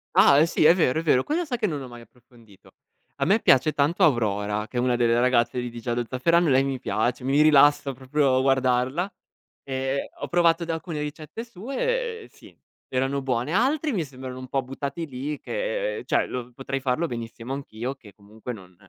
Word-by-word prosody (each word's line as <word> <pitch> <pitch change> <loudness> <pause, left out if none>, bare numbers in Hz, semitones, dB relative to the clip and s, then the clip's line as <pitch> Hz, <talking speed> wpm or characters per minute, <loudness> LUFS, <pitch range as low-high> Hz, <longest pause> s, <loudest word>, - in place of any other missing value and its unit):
Ah 145 +3 +6
sì, 165 - 0
è 165 - +7
vero, 160 -5 +2
è - - -2
vero. 130 -5 +3
Quello 335 +4 -1
sa 260 -6 -3
che 225 - -1
non 155 -7 -2
l'ho 130 - -8
mai 120 -1 -11
approfondito. 115 -3 -21 0.4
A - - -1
me 205 +4 +4
piace 135 - +4
tanto 150 +6 +1
Aurora, 105 -6 +1
che 125 - -7
è - - +2
una 125 0 +2
delle 120 -1 +2
ragazze 125 0 +2
di 125 -1 -4
di 120 - -8
Giallo 120 0 -2
zafferano, 170 +7 +2
e - - +2
lei 130 +1 +4
mi 135 -1 -2
piace, 125 0 -1
mi 135 +3 +3
rilassa 145 -2 +5
proprio 130 +1 +1
guardarla. 135 +6 +1 0.5
Ehm, 135 0 -2 0.2
ho - - -4
provato 170 -1 +2
da 165 - -2
alcune 160 -2 -5
ricette 155 +9 -6
sue, 450 - -3
ehm, - - -13
sì, - - -18 0.3
erano 135 +2 -1
buone. 130 +3 -1
Altri 285 +8 +1
mi 180 - 0
sembrano 130 -2 -9
un 130 - -8
po' 135 - 0
buttati 140 +5 -5
lì 140 +2 -5
che, - - -3
ehm, 435 - -7
cioè 125 -1 -1
potrei 135 +2 -4
farlo 135 +5 0
benissimo 115 0 -6
anch'io 130 -2 -5
che 105 -7 -16
comunque 105 +5 -9
non 90 -4 -13
135 Hz, 200 wpm, -25 LUFS, 125-165 Hz, 0.5 s, è